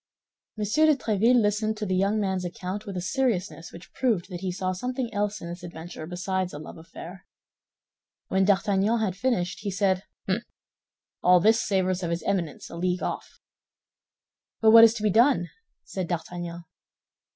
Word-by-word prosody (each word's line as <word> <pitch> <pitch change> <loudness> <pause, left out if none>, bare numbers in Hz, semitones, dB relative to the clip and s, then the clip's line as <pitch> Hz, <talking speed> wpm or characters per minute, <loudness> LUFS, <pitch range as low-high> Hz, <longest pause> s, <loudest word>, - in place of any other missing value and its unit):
M. 215 - -2
de 310 +8 +4
Tréville 230 0 +3
listened 215 0 0
to 210 - -3
the 190 - -1
young 200 +3 +2
man's 190 -3 -1
account 190 +3 -5
with 195 -2 -5
a - - -2
seriousness 195 -5 -1
which 170 - -13
proved 220 -9 0
that 175 - -5
he 190 -1 -2
saw 185 +1 -2
something 250 +5 -3
else 205 +1 -1
in 170 - -6
this 175 +2 -7
adventure 170 -2 -8
besides 185 0 -2
a - - -6
love 155 +2 -10
affair. 170 +3 -11 1.0
When 190 0 +2
D'Artagnan 200 +3 +2
had 200 -5 -1
finished, 195 -6 -1
he 205 - -4
said, 190 -1 0 0.2
"Hum! 195 +4 0 0.8
All 180 0 +6
this 220 +5 +4
savors 185 -2 0
of 170 - -2
his 170 0 -2
Eminence, 180 -6 -2
a 170 - -7
league 180 +1 -1
off." - - -5 1.2
"But 220 -1 +5
what 230 0 +10
is 225 0 +7
to 215 - -5
be 210 - +3
done?" 235 -4 +3 0.3
said 185 -3 -4
D'Artagnan. 175 0 -5
190 Hz, 175 wpm, -26 LUFS, 180-215 Hz, 1.2 s, what